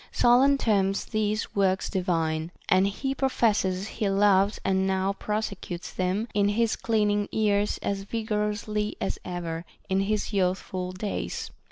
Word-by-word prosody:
Solon 260 Hz, +4 st, +5 dB
terms 195 Hz, -5 st, +1 dB
these 215 Hz, 0 st, -1 dB
works 190 Hz, -1 st, +2 dB
divine, 165 Hz, -4 st, -1 dB, 0.2 s
and 185 Hz, +1 st, +4 dB
he 270 Hz, +7 st, -2 dB
professes 210 Hz, -8 st, +1 dB
he 215 Hz, -3 st, -2 dB
loves 200 Hz, 0 st, +3 dB
and 190 Hz, 0 st, +2 dB
now 190 Hz, +1 st, +1 dB
prosecutes 200 Hz, -4 st, -4 dB
them 185 Hz, +5 st, -1 dB
in 205 Hz, -1 st, +3 dB
his 225 Hz, +2 st, +1 dB
de -, -, -21 dB
clining 210 Hz, -2 st, +1 dB
years 205 Hz, -1 st, +1 dB
as 200 Hz, -1 st, -1 dB
vigorously 210 Hz, 0 st, -2 dB
as -, -, -2 dB
ever 170 Hz, -2 st, -4 dB, 0.3 s
in 190 Hz, 0 st, +2 dB
his 210 Hz, +2 st, -1 dB
youthful 185 Hz, -1 st, -1 dB
days. 195 Hz, +3 st, -4 dB
200 Hz, 140 wpm, -27 LUFS, 190-215 Hz, 0.3 s, Solon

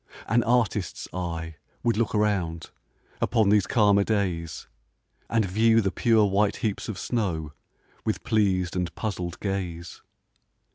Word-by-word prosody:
An 120 Hz, +2 st, +3 dB
artist's 115 Hz, -6 st, 0 dB
eye 80 Hz, -3 st, -4 dB, 0.3 s
would 120 Hz, -1 st, +2 dB
look 115 Hz, 0 st, 0 dB
around, 95 Hz, -6 st, 0 dB, 0.5 s
Upon 110 Hz, -4 st, +2 dB
these 100 Hz, -2 st, +4 dB
calmer 100 Hz, -3 st, +4 dB
days, 90 Hz, -7 st, -2 dB, 0.6 s
And 115 Hz, -2 st, +2 dB
view 110 Hz, +4 st, +3 dB
the 95 Hz, -3 st, +1 dB
pure 115 Hz, -4 st, +3 dB
white 100 Hz, +1 st, +2 dB
heaps 105 Hz, -1 st, -3 dB
of 105 Hz, -, -4 dB
snow, 85 Hz, -12 st, -2 dB, 0.5 s
With -, -, -2 dB
pleas'd 95 Hz, -5 st, +1 dB
and 90 Hz, -1 st, -2 dB
puzzl'd 90 Hz, -5 st, -4 dB
gaze. 90 Hz, -4 st, -4 dB
100 Hz, 130 wpm, -26 LUFS, 90-110 Hz, 0.6 s, these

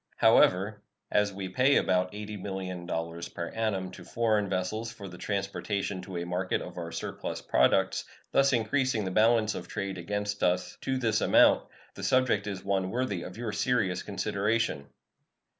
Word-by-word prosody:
However, 100 Hz, +3 st, +4 dB, 0.3 s
as 105 Hz, -1 st, +3 dB
we 95 Hz, -1 st, -5 dB
pay 130 Hz, +8 st, +3 dB
about 90 Hz, 0 st, +2 dB
$80,000,000 90 Hz, -5 st, -5 dB
per 85 Hz, -1 st, -3 dB
annum 100 Hz, -5 st, -2 dB
to 90 Hz, -, -11 dB
foreign 110 Hz, 0 st, +1 dB
vessels 105 Hz, +5 st, -2 dB
for 100 Hz, -, -9 dB
the 90 Hz, -1 st, -10 dB
transportation 100 Hz, -1 st, -2 dB
to 90 Hz, -1 st, -7 dB
a 85 Hz, -, -3 dB
market 90 Hz, +1 st, -1 dB
of 90 Hz, 0 st, -7 dB
our 85 Hz, -1 st, -5 dB
surplus -, -, -4 dB
products, -, -, +2 dB, 0.3 s
thus 135 Hz, 0 st, +4 dB
increasing 120 Hz, -2 st, +1 dB
the 95 Hz, -, -2 dB
balance 110 Hz, +1 st, +4 dB
of -, -, -6 dB
trade 95 Hz, -2 st, -4 dB
against 105 Hz, +3 st, -3 dB
us 90 Hz, +1 st, +1 dB
to 130 Hz, -1 st, -1 dB
this 115 Hz, -4 st, +1 dB
amount, -, -, +5 dB, 0.3 s
the -, -, -9 dB
subject 130 Hz, -6 st, +2 dB
is 95 Hz, -2 st, -5 dB
one 95 Hz, -1 st, 0 dB
worthy 115 Hz, -5 st, -1 dB
of 90 Hz, +3 st, -8 dB
your 115 Hz, -2 st, -3 dB
serious 105 Hz, -4 st, +1 dB
consideration. 100 Hz, -8 st, -1 dB
100 Hz, 160 wpm, -29 LUFS, 90-110 Hz, 0.3 s, amount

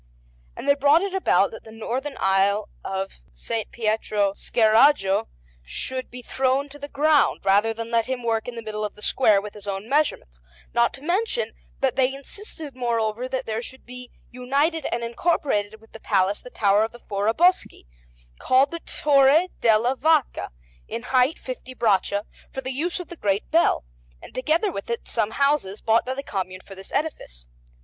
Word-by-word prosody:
And 275 Hz, -, -7 dB
they 280 Hz, -, +7 dB
brought 285 Hz, +5 st, +4 dB
it 395 Hz, -1 st, -3 dB
about 375 Hz, -, +3 dB
that 225 Hz, -, -10 dB
the 220 Hz, -, -13 dB
northern 255 Hz, +6 st, -4 dB
aisle 195 Hz, +2 st, +2 dB
of 195 Hz, 0 st, -3 dB, 0.2 s
S. 225 Hz, -2 st, -3 dB
Pietro 215 Hz, -3 st, 0 dB
Scheraggio 220 Hz, -2 st, +3 dB, 0.3 s
should 255 Hz, -, -4 dB
be 250 Hz, 0 st, -9 dB
thrown 265 Hz, +3 st, 0 dB
to 290 Hz, +1 st, -12 dB
the 285 Hz, -, -6 dB
ground, 295 Hz, +1 st, +3 dB
rather 200 Hz, +3 st, +3 dB
than 230 Hz, +1 st, -6 dB
let 230 Hz, -1 st, +2 dB
him 255 Hz, -2 st, -3 dB
work 225 Hz, -1 st, 0 dB
in 245 Hz, -, -5 dB
the 230 Hz, -, -6 dB
middle 215 Hz, -1 st, -4 dB
of 210 Hz, -, -4 dB
the 210 Hz, -, -12 dB
square 215 Hz, -6 st, +4 dB
with 205 Hz, +1 st, -8 dB
his 205 Hz, -1 st, -10 dB
own 195 Hz, +2 st, -4 dB
measurements; 270 Hz, -, 0 dB, 0.3 s
not -, -, +3 dB
to 270 Hz, -, -14 dB
mention 425 Hz, +8 st, -1 dB, 0.3 s
that 265 Hz, -3 st, +1 dB
they 260 Hz, 0 st, +3 dB
insisted, 300 Hz, -, -9 dB
moreover, 235 Hz, -1 st, -1 dB
that 260 Hz, 0 st, -3 dB
there 220 Hz, 0 st, -2 dB
should 260 Hz, +2 st, -9 dB
be 250 Hz, 0 st, -10 dB, 0.2 s
united 280 Hz, +5 st, 0 dB
and 235 Hz, -, -2 dB
incorporated 230 Hz, -5 st, -1 dB
with 225 Hz, -, -21 dB
the 225 Hz, -, -11 dB
Palace 190 Hz, -1 st, +1 dB
the 250 Hz, -, -11 dB
Tower 205 Hz, -2 st, +3 dB
of 225 Hz, -, -3 dB
the 240 Hz, -, -12 dB
Foraboschi, 225 Hz, -, +1 dB, 0.5 s
called 265 Hz, +2 st, +3 dB
the 335 Hz, -, -4 dB
"Torre 290 Hz, +3 st, +3 dB
della 230 Hz, +3 st, +3 dB
Vacca," 310 Hz, +1 st, +1 dB, 0.4 s
in 235 Hz, -, -5 dB
height 255 Hz, +4 st, +4 dB
fifty 255 Hz, 0 st, -8 dB
braccia, 205 Hz, -2 st, +1 dB, 0.3 s
for 265 Hz, -, -5 dB
the 260 Hz, 0 st, -4 dB
use 340 Hz, +7 st, -2 dB
of 360 Hz, -, -8 dB
the 345 Hz, -, -8 dB
great 200 Hz, -3 st, -1 dB
bell, 325 Hz, -, +3 dB, 0.3 s
and -, -, -13 dB
together 320 Hz, +10 st, +1 dB
with 200 Hz, -, -6 dB
it 235 Hz, -, -3 dB
some 220 Hz, -3 st, 0 dB
houses 275 Hz, -6 st, +1 dB
bought 225 Hz, +2 st, +2 dB
by 260 Hz, -, -2 dB
the 275 Hz, -, -5 dB
Commune 185 Hz, -5 st, -4 dB
for 195 Hz, -, -12 dB
this 190 Hz, 0 st, -12 dB
edifice. -, -, -4 dB
240 Hz, 185 wpm, -24 LUFS, 210-280 Hz, 0.5 s, they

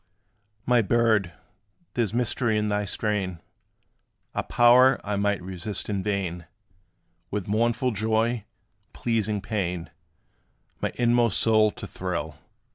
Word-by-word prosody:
My 120 Hz, -1 st, +4 dB
bird, 110 Hz, -4 st, +2 dB, 0.6 s
there 120 Hz, -, +1 dB
's -, -, -9 dB
mystery 120 Hz, -1 st, 0 dB
in 105 Hz, 0 st, 0 dB
thy 105 Hz, 0 st, 0 dB
strain 100 Hz, -4 st, -2 dB, 0.9 s
A -, -, 0 dB
power 125 Hz, +2 st, +5 dB
I 105 Hz, 0 st, -2 dB
might 100 Hz, -1 st, 0 dB
resist 95 Hz, +3 st, -5 dB
in 100 Hz, -2 st, -1 dB
vain, 95 Hz, -4 st, -3 dB, 0.8 s
With 100 Hz, -2 st, -3 dB
mournful 120 Hz, +4 st, +1 dB
joy 110 Hz, +1 st, 0 dB, 0.3 s
with -, -, -41 dB
pleasing 110 Hz, -3 st, -1 dB
pain 90 Hz, -5 st, -3 dB, 0.9 s
My -, -, -1 dB
inmost 120 Hz, -3 st, +3 dB
soul 110 Hz, -1 st, +4 dB
to 120 Hz, -4 st, -8 dB
thrill. 85 Hz, -6 st, -4 dB
105 Hz, 120 wpm, -26 LUFS, 95-115 Hz, 0.9 s, power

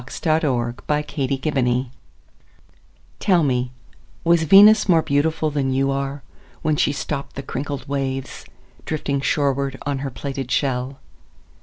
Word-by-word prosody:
Venus 125 Hz, -, -9 dB
Transiens 130 Hz, -7 st, 0 dB
By 150 Hz, 0 st, 0 dB
Amy 135 Hz, -2 st, -1 dB, 0.3 s
Lowell 125 Hz, 0 st, -2 dB, 1.3 s
TELL 180 Hz, -4 st, +3 dB
me, 125 Hz, -3 st, 0 dB, 0.5 s
Was 170 Hz, 0 st, +4 dB
Venus 205 Hz, +5 st, +7 dB
more 165 Hz, -3 st, +5 dB
beautifulThan 145 Hz, -1 st, 0 dB
you 135 Hz, +1 st, +1 dB
are, 140 Hz, 0 st, -3 dB, 0.4 s
When 155 Hz, -2 st, +2 dB
she 145 Hz, -, +2 dB
stoppedThe 140 Hz, -1 st, -5 dB
crinkled 140 Hz, 0 st, -5 dB
waves, 135 Hz, -1 st, -3 dB, 0.4 s
Drifting 140 Hz, -3 st, -2 dB
shorewardOn 140 Hz, 0 st, -1 dB
her 135 Hz, 0 st, -3 dB
plaited 135 Hz, +1 st, -5 dB
shell? 130 Hz, -1 st, -1 dB
140 Hz, 120 wpm, -21 LUFS, 135-150 Hz, 1.3 s, Venus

